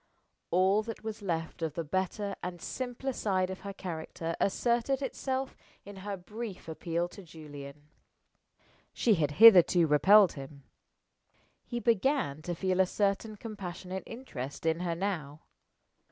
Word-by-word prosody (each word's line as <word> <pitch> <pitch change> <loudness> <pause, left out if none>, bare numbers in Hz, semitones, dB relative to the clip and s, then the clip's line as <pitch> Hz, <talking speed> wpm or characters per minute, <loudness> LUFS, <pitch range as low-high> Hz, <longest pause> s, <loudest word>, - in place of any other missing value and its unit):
All 190 +4 +3
that 225 0 -7
was 220 -1 -5
left 165 -4 -3
of 160 -3 -2
the 165 - -2
better 190 +5 -2
and 180 -1 -5
simpler 255 +6 -4
side 190 -5 0
of 190 - -6
her 200 - -6
character 165 -3 -5
asserted 240 +6 +1
itself 265 0 -3 0.3
in 200 0 -10
her 200 +1 -5
brief 210 +1 -7
appeal 170 +1 -2
to 200 - -11
Julian. 150 -4 -11 1.1
She 230 - +3
had 150 -6 0
hitherto 180 -3 +8
repelled 190 +6 +6
him. 140 0 -10 1.0
He 240 - -3
began 230 - +1
to 175 +2 -4
feel 185 +1 0
a 190 - +5
certain 205 +3 0
compassionate 190 -3 -6
interest 145 - -7
in 160 0 +2
her 175 -2 -1
now. 160 -6 -3
185 Hz, 140 wpm, -30 LUFS, 165-215 Hz, 1.1 s, hitherto